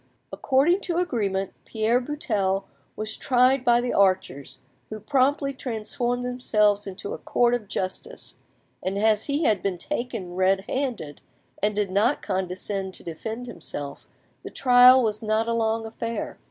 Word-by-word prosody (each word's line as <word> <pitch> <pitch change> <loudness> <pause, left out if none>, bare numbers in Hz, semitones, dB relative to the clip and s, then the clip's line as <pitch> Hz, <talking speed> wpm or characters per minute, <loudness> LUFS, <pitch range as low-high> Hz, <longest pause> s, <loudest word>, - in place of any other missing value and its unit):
According 295 +8 +2
to 340 -2 -2
agreement, 200 - -1
Pierre 225 +3 +1
Buttel 215 -9 -1 0.3
was 215 0 -3
tried 255 +1 +3
by 240 -2 +4
the 245 0 -2
archers, 185 -8 +1 0.3
who 215 - -6
promptly 275 +4 +1
transformed 245 0 -3
themselves 210 -5 +1
into 195 +1 -6
a - - -6
court 240 0 +2
of 235 -4 -2
justice, 205 - -5 0.4
and 190 +1 -2
as 215 0 +2
he 290 +3 -1
had 210 -9 +2
been 195 -3 -2
taken 230 -6 -4
red 190 +1 +2
handed, 230 - -4 0.4
and 210 +1 +1
did 205 -2 -1
not 215 +9 +2
condescend 190 0 -2
to - - -10
defend 220 +9 -6
himself, 155 -10 -7 0.3
the - - -8
trial 250 0 +6
was 215 -2 -1
not 220 +1 0
a 230 - 0
long 225 0 0
affair. 230 +1 -5
220 Hz, 150 wpm, -25 LUFS, 195-250 Hz, 0.4 s, trial